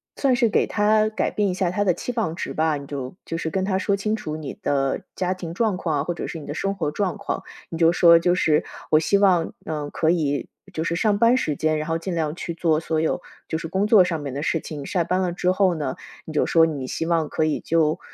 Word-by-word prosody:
算 270 Hz, -3 st, +2 dB
是 240 Hz, -1 st, +3 dB
给 215 Hz, -, +2 dB
他 215 Hz, +1 st, +3 dB
改 215 Hz, -, -1 dB
变 205 Hz, -1 st, 0 dB
一 -, -, -1 dB
下 185 Hz, -2 st, 0 dB
他 205 Hz, +3 st, 0 dB
的 190 Hz, -, +3 dB
期 245 Hz, +8 st, -4 dB
望 215 Hz, -9 st, -1 dB
值 -, -, -4 dB
吧， 155 Hz, -1 st, +1 dB
你 140 Hz, -, -8 dB
就 140 Hz, 0 st, -6 dB
就 -, -, -4 dB
是 165 Hz, -1 st, -2 dB
跟 190 Hz, +3 st, -1 dB
他 190 Hz, -1 st, 0 dB
说 200 Hz, 0 st, +1 dB
清 215 Hz, +2 st, -1 dB
楚 155 Hz, -8 st, -5 dB
你 150 Hz, -3 st, -6 dB
的 135 Hz, -1 st, 0 dB
家 185 Hz, 0 st, 0 dB
庭 170 Hz, -3 st, -7 dB
状 220 Hz, -1 st, +1 dB
况 165 Hz, -4 st, -1 dB
啊， -, -, -1 dB
或 175 Hz, -, -2 dB
者 -, -, -5 dB
是 -, -, -6 dB
你 150 Hz, -, -9 dB
的 145 Hz, -, -5 dB
生 195 Hz, +5 st, -2 dB
活 150 Hz, -, -2 dB
状 200 Hz, +3 st, -1 dB
况， 200 Hz, -, -3 dB, 0.3 s
你 165 Hz, -, -6 dB
就 165 Hz, -1 st, +5 dB
说： 170 Hz, -1 st, +6 dB
“就 175 Hz, +1 st, +3 dB
是 155 Hz, -4 st, +2 dB, 0.3 s
我 155 Hz, -, +6 dB
希 180 Hz, +5 st, +2 dB
望， 185 Hz, -4 st, +3 dB
嗯， 150 Hz, -2 st, -3 dB
可 160 Hz, +2 st, +1 dB
以 145 Hz, -5 st, -1 dB, 0.2 s
就 160 Hz, -3 st, -3 dB
是 170 Hz, 0 st, -1 dB
上 205 Hz, +3 st, +2 dB
班 230 Hz, +3 st, +5 dB
时 155 Hz, -, 0 dB
间， 155 Hz, +1 st, 0 dB
然 155 Hz, -, -4 dB
后 165 Hz, -, +1 dB
尽 175 Hz, +3 st, -4 dB
量 155 Hz, -2 st, -1 dB
去 170 Hz, -, -5 dB
做 165 Hz, -2 st, +1 dB
所 160 Hz, -1 st, -1 dB
有 160 Hz, -, 0 dB, 0.3 s
就 160 Hz, -, -2 dB
是 165 Hz, -, -5 dB
工 190 Hz, +5 st, 0 dB
作 210 Hz, -3 st, +7 dB
上 165 Hz, -4 st, -2 dB
面 140 Hz, -2 st, -5 dB
的 145 Hz, -, -3 dB
事 165 Hz, -, 0 dB
情。” 150 Hz, -2 st, -7 dB
下 175 Hz, +2 st, 0 dB
班 185 Hz, +3 st, 0 dB
了 180 Hz, -2 st, -1 dB
之 180 Hz, +1 st, 0 dB
后 185 Hz, -1 st, +3 dB
呢， 145 Hz, -5 st, -3 dB, 0.3 s
你 -, -, -7 dB
就 150 Hz, -, +2 dB
说 165 Hz, -1 st, +4 dB
你 145 Hz, -5 st, -4 dB
希 165 Hz, +5 st, -3 dB
望 165 Hz, -2 st, +1 dB
可 155 Hz, -, -1 dB
以 155 Hz, -1 st, 0 dB
就， 160 Hz, -2 st, +1 dB
170 Hz, 290 characters per minute, -23 LUFS, 155-190 Hz, 0.3 s, 作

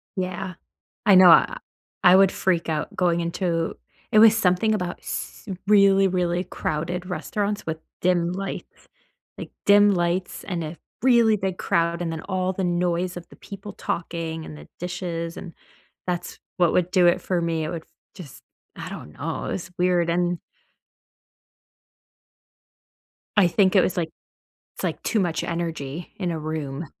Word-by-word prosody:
Yeah. 185 Hz, -1 st, -3 dB, 0.5 s
I 200 Hz, -3 st, +7 dB
know 185 Hz, -1 st, +9 dB
I -, -, +6 dB, 0.5 s
I 180 Hz, 0 st, +8 dB
would 195 Hz, 0 st, +6 dB
freak 175 Hz, -3 st, 0 dB
out 155 Hz, -2 st, -2 dB
going 175 Hz, -2 st, +2 dB
into 170 Hz, -1 st, -1 dB, 0.4 s
it 215 Hz, -, +6 dB
was 225 Hz, 0 st, +8 dB
something 200 Hz, +2 st, +2 dB
about 180 Hz, -4 st, -3 dB
s -, -, -6 dB, 0.2 s
really, 195 Hz, -1 st, +5 dB
really 180 Hz, -1 st, 0 dB
crowded 175 Hz, +1 st, -3 dB
restaurants 205 Hz, +3 st, -2 dB
with 160 Hz, 0 st, -3 dB, 0.2 s
dim 175 Hz, -1 st, +2 dB
lights. 195 Hz, +1 st, -6 dB, 0.5 s
Like, -, -, -8 dB, 0.2 s
dim 205 Hz, 0 st, +6 dB
lights 175 Hz, +1 st, -1 dB
and 175 Hz, -4 st, -3 dB
a 155 Hz, +2 st, -6 dB, 0.3 s
really 235 Hz, -4 st, +5 dB
big 190 Hz, -2 st, -3 dB
crowd 170 Hz, +1 st, 0 dB
and 165 Hz, -, -2 dB
then 160 Hz, -, -4 dB
all 185 Hz, -1 st, -1 dB
the 190 Hz, 0 st, -2 dB
noise 175 Hz, 0 st, 0 dB
of 175 Hz, -, -8 dB
the -, -, -16 dB
people 200 Hz, 0 st, -9 dB
talking 165 Hz, -3 st, -4 dB
and 155 Hz, -, -9 dB
the -, -, -13 dB
dishes, 175 Hz, -2 st, -4 dB
and 170 Hz, -, -9 dB, 0.5 s
that's 180 Hz, -1 st, -4 dB, 0.2 s
what 175 Hz, -2 st, +3 dB
would 180 Hz, 0 st, +1 dB
do 180 Hz, -2 st, +4 dB
it 175 Hz, -, +4 dB
for 180 Hz, -2 st, -1 dB
me, 165 Hz, -1 st, -1 dB
it 155 Hz, -, -3 dB
would 170 Hz, -2 st, -6 dB
f -, -, -37 dB, 0.3 s
just 175 Hz, -8 st, -11 dB, 0.3 s
I -, -, -6 dB
don't 75 Hz, -, -9 dB
know, 160 Hz, +2 st, -4 dB
it -, -, -2 dB
was 185 Hz, -1 st, -5 dB
weird, 175 Hz, -1 st, +2 dB
an 175 Hz, 0 st, 0 dB, 3.0 s
I 190 Hz, -4 st, +6 dB
think 190 Hz, +2 st, +3 dB
it 190 Hz, -, +7 dB
was, 180 Hz, -, -1 dB
like 165 Hz, -2 st, -1 dB, 0.7 s
it's, -, -, -8 dB
like, -, -, -2 dB
too 225 Hz, -, +1 dB
much 175 Hz, -5 st, 0 dB
energy 165 Hz, -2 st, -4 dB
in 180 Hz, -4 st, -2 dB
a 160 Hz, -, -3 dB
room. 155 Hz, -1 st, -4 dB
180 Hz, 165 wpm, -24 LUFS, 170-190 Hz, 3.0 s, know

